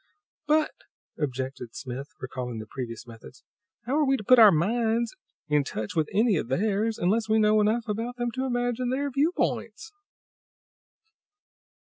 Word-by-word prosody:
"But," 305 0 +3 0.5
objected 130 -4 -4
Smith, 130 +2 -6
recalling 125 -2 -5
the 110 - -6
previous 115 0 -7
methods, 115 +2 -13 0.4
"how 265 +5 0
are 310 - +3
we 270 -1 +2
to 215 - -7
put 255 +4 +6
our 215 -3 +9
minds 225 - +1 0.3
in 150 -1 +2
touch 110 -5 -5
with 160 -2 +1
any 215 -1 +3
of 150 - -2
theirs, 210 - 0
unless 215 +5 +1
we 220 - +4
know 215 0 +4
enough 225 +2 +1
about 225 +4 -3
them 240 -1 -2
to 260 +2 -3
imagine 245 0 -1
their 280 +2 -1
viewpoints?" 320 - -1
215 Hz, 150 wpm, -27 LUFS, -, 0.5 s, our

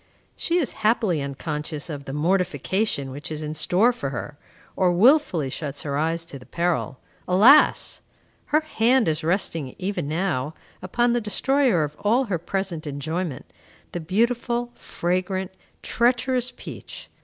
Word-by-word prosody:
She 345 - 0
is 320 -7 0
happily 210 -7 +2
unconscious 150 +2 -4
of 145 -4 -6
the - - -6
mortification 180 -1 0
which 145 +4 -7
is 155 0 -4
in 150 0 -4
store 185 +10 +3
for 140 - -4
her, 135 +3 -6 0.4
or 185 -2 +3
wilfully 185 - +4
shuts 145 -1 -4
her 140 -2 -2
eyes 165 +3 0
to 140 -4 -9
the 125 - -15
peril. 170 -6 -1 0.3
Alas! 225 +12 +5 0.4
Her 305 +1 +2
hand 255 -4 +2
is 155 +1 0
resting, 165 -5 -1
even 190 -5 -3
now, 160 -3 -1 0.3
upon 240 +6 +1
the 240 - +1
destroyer 245 - +2
of 150 0 -4
all 235 +6 +3
her 195 -9 -2
present 175 -2 -3
enjoyment, 155 +1 -3 0.5
the 175 - -3
beautiful, 235 +7 0
fragrant, 185 0 -2 0.3
treacherous 245 +1 +1
peach. - - -9
180 Hz, 145 wpm, -24 LUFS, 150-230 Hz, 0.5 s, Alas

